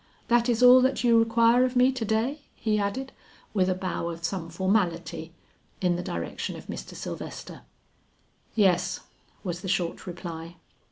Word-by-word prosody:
That 240 0 +3
is 240 +1 +2
all 250 +1 +9
that 260 +1 +1
you 235 -1 +5
require 230 +2 +4
of 255 0 0
me 250 +1 +5
to 255 -3 -4
day?" 225 +7 0
he 215 -2 0
added, 245 +7 -2 0.4
with 190 -3 +2
a 185 - +1
bow 185 -2 -3
of 165 0 -7
some 170 -1 -3
formality 170 -3 -1 0.5
in 180 -2 +2
the 175 - -2
direction 85 - -4
of - - -10
Mr. - - -7
Sylvester. - - -7 0.9
"Yes," 185 -5 +2 0.4
was 175 -3 -4
the 190 - -6
short 175 -2 -1
reply. 170 -1 -7
200 Hz, 160 wpm, -27 LUFS, 175-235 Hz, 0.9 s, all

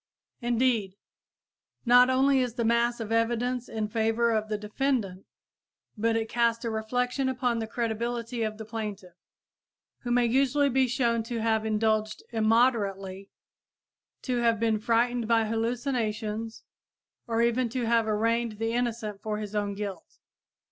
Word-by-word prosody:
Indeed, 235 -5 +1 0.9
not 245 +1 +7
only 265 +1 +3
is 250 -3 -1
the 235 -2 -1
mass 235 +1 +2
of 225 -1 -5
evidence 240 +2 0
in 215 -1 -2
favor 225 +2 +1
of 215 -1 -1
the 210 - -1
defendant, 210 -3 -2 0.7
but 225 +1 +1
it 225 0 0
casts 235 0 +1
a 230 - -1
reflection 245 +4 -1
upon 245 -2 0
the 225 - -3
credibility 235 +1 -3
of 215 -1 -2
the 220 - -7
plaintiff, 210 -5 -6 0.9
who 245 - -6
may 240 0 +3
usually 275 +4 +2
be 265 0 +2
shown 235 -2 +1
to 235 0 -3
have 220 -1 +1
indulged 215 0 0
immoderately, 215 -4 +1 0.9
to 250 -2 -1
have 230 -2 +2
been 220 -1 +1
frightened 235 +1 +1
by 225 -1 +3
hallucinations 225 -1 -2 0.6
or 230 0 +1
even 235 +1 +1
to 245 0 -2
have 230 -1 +2
arraigned 230 +2 +1
the 225 +2 -2
innocent 230 -4 -2
for 215 -1 -3
his 210 -1 -6
own 205 -1 -1
guilt. 195 -4 -7
230 Hz, 145 wpm, -27 LUFS, 215-240 Hz, 0.9 s, not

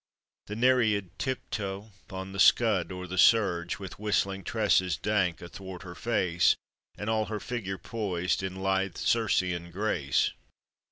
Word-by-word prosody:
The 105 - -5
Nereid 110 -6 +2
tip 130 -1 -3
toe 100 0 -4 0.2
on 95 0 -6
the 95 - -6
scud 95 -2 +4
o' 90 0 -6
the 95 +1 -3
surge, 90 -6 +4
With 95 -2 -9
whistling 100 -2 0
tresses 95 -7 +2
dank 95 -6 0
athwart 95 +1 -9
her 90 -2 -8
face, 90 -6 +2 0.4
And 105 - -5
all 110 -1 +1
her 105 0 -4
figure 100 -6 -4
poised 95 -7 -2
in 95 -1 -4
lithe 95 -1 0
Circean 90 -6 +1
grace? 85 -8 +1
95 Hz, 145 wpm, -29 LUFS, 90-105 Hz, 0.4 s, scud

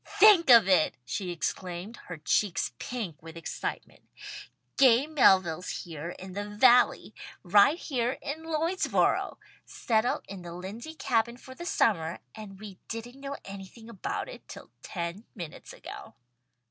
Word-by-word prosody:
"Think 390 -7 +7
of 230 -5 +9
it!" 180 -5 +3
she 180 +9 -3
exclaimed, 180 +4 -4
her 175 - -6
cheeks 190 +5 0
pink 210 - -5
with 165 +1 -11
excitement. 165 - -5 0.7
"Gay 260 0 +6
Melville's 190 - +3
here 165 -1 -7
in 185 0 -9
the 205 +2 -4
Valley! 245 +4 +4 0.3
Right 205 - +5
here 250 -7 -1
in 290 +2 -5
Lloydsboro! 325 +4 0 0.3
Settled 225 +1 0
in 195 -2 -8
the 170 -1 -8
Lindsey 210 - -8
Cabin 235 -5 0
for 260 0 -12
the 345 +6 -8
summer, 175 - +1 0.2
and 205 -3 -10
we 200 -3 -10
didn't 240 +4 -7
know 280 0 -5
anything 200 +4 -10
about 195 - -4
it - - -11
till - - -11
ten 170 +3 -5
minutes 170 -7 -8
ago." - - -10
215 Hz, 140 wpm, -28 LUFS, 180-255 Hz, 0.7 s, of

